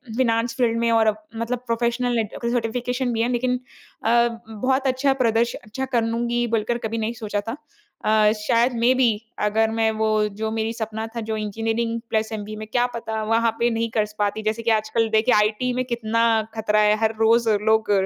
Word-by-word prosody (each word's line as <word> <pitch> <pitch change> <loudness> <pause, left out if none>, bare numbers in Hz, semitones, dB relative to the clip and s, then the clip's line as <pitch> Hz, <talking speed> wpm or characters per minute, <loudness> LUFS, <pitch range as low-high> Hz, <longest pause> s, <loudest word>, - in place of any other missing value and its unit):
Finance 230 -2 +1
field 230 -2 +2
में 235 0 +2
और 225 -1 +4 0.3
मतलब 230 +2 -2
प्रोफ़ेशनलैट 235 -1 0
सर्टिफ़िकेशन 245 +2 -1
भी 225 - 0
है, 240 - +1
लेकिन 250 +1 0 0.5
अ, - - +3 0.4
बहुत 260 +5 0
अच्छा 265 +1 +2
प्रदर्श 230 +1 +2
अच्छा 265 +5 -5
कर 240 -3 0
लूँगी, 235 +1 0
बोलकर 225 +2 0
कभी 225 - -4
नहीं 225 +1 -2
सोचा 205 -2 -2
था। 240 - -3 0.5
अ, 215 -1 +4
शायद 235 +4 +2
मे 245 +2 +4
बी 255 -2 +4 0.4
अगर 220 +1 +2
मैं 225 0 +1
वो 220 0 -1 0.3
जो 220 0 -1
मेरी 225 0 -1
सपना 220 -1 -4
था, 230 - -2
जो 220 0 -3
इंजीनियरिंग 225 +2 -2
प्लस 220 0 0
ऐमबीए 215 0 -5
में, 215 0 -7
क्या 245 0 +2
पता 220 -1 -3
वहाँ 225 +1 +2
पे 235 - +3
नहीं 230 0 -1
कर 215 -2 +1
स 210 0 -15
पाती। 205 +1 0
जैसे 220 +1 -1
कि 230 - +2
आजकल 220 +1 +1
देखिए, 220 +3 +3
आईटी 215 +4 +2
में 255 - 0
कितना 230 -2 0 0.3
ख़तरा 215 -1 +1
है, 210 0 +4
हर 220 0 +2
रोज़ 225 +1 +4
लोग 220 0 +2
225 Hz, 195 wpm, -23 LUFS, 220-235 Hz, 0.5 s, और